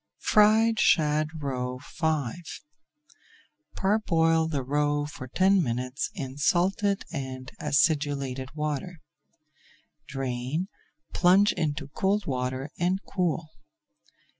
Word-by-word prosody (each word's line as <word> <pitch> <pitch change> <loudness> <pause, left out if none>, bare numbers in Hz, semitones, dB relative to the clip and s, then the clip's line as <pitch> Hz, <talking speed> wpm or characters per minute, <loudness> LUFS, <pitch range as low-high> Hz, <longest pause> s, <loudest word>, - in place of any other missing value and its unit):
FRIED 220 +2 +4
SHAD 150 -1 +3 0.2
ROE 125 -2 -3 0.2
V 155 -7 0 1.4
Parboil 165 -6 +2
the 145 -4 -2
roe 145 +2 0
for 145 -3 -8
ten 190 +8 +3
minutes 125 -1 -2
in 135 0 -6
salted 195 +6 +1
and 130 -3 -5
acidulated 140 -3 0
water. 150 +3 -3 1.1
Drain, 135 +5 -3 0.4
plunge 190 +4 +4
into 155 -4 -2
cold 195 +7 0
water, 130 +1 -3
and 180 +2 +1
cool. 170 -4 -1
150 Hz, 90 wpm, -27 LUFS, 135-180 Hz, 1.4 s, FRIED